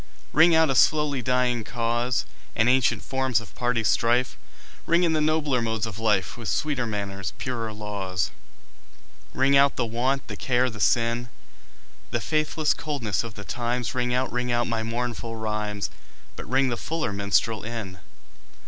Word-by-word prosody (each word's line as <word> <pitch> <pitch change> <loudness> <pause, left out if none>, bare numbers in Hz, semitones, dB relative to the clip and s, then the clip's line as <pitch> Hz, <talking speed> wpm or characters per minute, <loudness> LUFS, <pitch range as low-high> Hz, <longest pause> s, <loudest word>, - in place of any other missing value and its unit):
Ring 165 +2 +6
out 160 -3 +4
a - - +2
slowly 145 0 +3
dying 125 -1 +1
cause, 120 +2 -1 0.3
And 110 - +3
ancient 130 0 +3
forms 130 -3 +1
of 110 - -12
party 120 -2 0
strife; 120 +3 +2 0.5
Ring 170 +2 +4
in 165 -2 +3
the 155 - +1
nobler 150 -4 +1
modes 110 -2 -1
of 110 -1 -7
life, 105 -2 +1
With 115 -3 -4
sweeter 140 -6 0
manners, 100 -3 -4
purer 115 -4 -3
laws. 100 -5 -3 1.0
Ring 135 +1 +3
out 140 0 +5
the 125 - 0
want, 125 +4 -1
the - - -5
care 125 -1 +1
the 105 - -10
sin, 120 +2 +1 0.8
The - - -1
faithless 155 0 +1
coldness 130 - -2
of 115 -3 -8
the 100 - -8
times; 120 +2 -2
Ring 125 -1 0
out, 125 +1 0
ring 125 0 -1
out 120 0 +2
my 115 -1 -1
mournful 115 0 -3
rhymes, 105 -2 -3 0.4
But - - -8
ring 130 +1 +3
the 120 - -2
fuller 155 -8 -2
minstrel 100 +2 +1
in. 110 -5 -5
120 Hz, 165 wpm, -25 LUFS, 110-130 Hz, 1.0 s, Ring